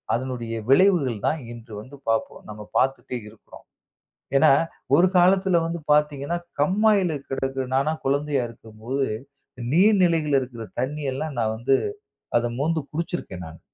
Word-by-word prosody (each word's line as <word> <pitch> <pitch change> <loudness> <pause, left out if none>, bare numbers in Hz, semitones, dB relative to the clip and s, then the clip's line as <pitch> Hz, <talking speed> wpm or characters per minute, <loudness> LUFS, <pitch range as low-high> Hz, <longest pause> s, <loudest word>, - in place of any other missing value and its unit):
அதனுடைய 120 -2 -4 0.2
விளைவுகள் 140 - +4
தான் 155 0 0
இன்று 115 -1 -12
வந்து 130 +6 -13
பார்க்குறோம். 115 0 -2
நாம 105 0 -9
பார்த்துட்டே 130 -1 -1
இருக்கிறோம். 110 0 -16 0.7
ஏன்னா, - - +6 0.4
ஒரு 180 - +6
காலத்தில 185 +1 +4
வந்து 165 +1 -3
பார்த்தீங்கன்னா, 150 +2 +1 0.2
கண்மாயில 195 +3 +3 0.2
கிடக்கிற 135 0 -2
நான்லாம் 155 +4 +1
குழந்தையா 140 0 +1
இருக்கும்போது 115 +4 -4 0.7
நீர் 200 +6 +5
நிலைகள்ல 160 -5 +3
இருக்குற 120 -3 -7 0.2
தண்ணீ 145 +4 -3
எல்லாம் 150 +1 -4
நான் 110 -1 0
வந்து 130 +4 +2 0.6
அத 120 0 0
மோந்து 160 +2 +1
குடிச்சிருக்கேன் 150 - -4
நான். 80 0 -11
135 Hz, 130 wpm, -24 LUFS, 120-165 Hz, 0.7 s, ஏன்னா